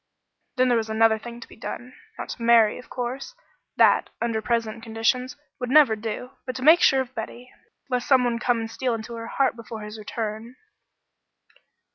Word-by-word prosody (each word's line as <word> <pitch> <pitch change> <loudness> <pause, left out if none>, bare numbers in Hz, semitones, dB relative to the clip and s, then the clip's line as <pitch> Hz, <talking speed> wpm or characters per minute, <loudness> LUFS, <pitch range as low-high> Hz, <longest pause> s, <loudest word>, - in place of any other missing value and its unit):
Then 255 0 +3
there 240 - +4
was 220 -1 -4
another 220 0 +3
thing 235 +1 -9
to - - -10
be - - -15
done. 245 +3 -7 0.2
Not - - -6
to - - -7
marry, 230 -2 +5
of 250 - -14
course; 255 - -5 0.4
that, - - +4
under 230 -2 -1
present 230 -1 -1
conditions, 225 +3 -1 0.2
would 250 - -3
never 275 -5 +6
do; 225 +3 -5 0.2
but 255 - -4
to 255 - -5
make 320 +4 +7
sure 265 0 +5
of 260 -1 -7
Betty, 240 +2 -7 0.4
lest 250 -2 -2
some 260 -2 +5
one 240 -1 0
come 240 -1 +1
and 225 0 -5
steal 245 0 -1
into 225 +1 -7
her 230 0 -6
heart 270 0 +1
before 230 -1 -8
his 210 +1 -8
return. 220 +2 -5
235 Hz, 190 wpm, -24 LUFS, 225-250 Hz, 0.4 s, make